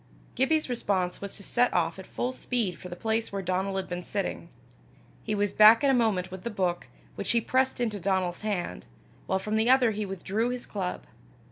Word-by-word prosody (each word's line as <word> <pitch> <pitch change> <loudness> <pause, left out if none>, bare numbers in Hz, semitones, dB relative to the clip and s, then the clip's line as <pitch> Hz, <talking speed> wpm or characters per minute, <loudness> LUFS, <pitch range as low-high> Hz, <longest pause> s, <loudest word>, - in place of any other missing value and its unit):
Gibbie's 305 +4 +2
response 195 -7 -1
was 200 -1 -5
to 200 - -10
set 245 +4 +2
off 165 +1 +1
at 190 - -10
full 250 - -2
speed 230 -9 -1
for 180 - -9
the 175 - -6
place 220 +3 -1
where 195 -1 -3
Donal 185 +2 -1
had 190 - -2
been 175 0 -4
sitting. 200 +3 -3 0.7
He 215 - -1
was 205 -1 0
back 215 +4 +8
in 275 - +5
a - - +3
moment 210 -7 +1
with 185 -1 -8
the 235 - -2
book, 185 -5 -1 0.3
which - - -5
he 235 - +4
pressed 260 +3 +1
into 220 -4 -1
Donal's 185 -1 0
hand, 200 - -3 0.4
while 190 - +1
from 210 +3 -2
the 220 +2 +2
other 255 -3 +5
he 210 -1 -3
withdrew 195 +5 -1
his 250 0 -4
club. 190 -3 -4
205 Hz, 210 wpm, -28 LUFS, 185-235 Hz, 0.7 s, back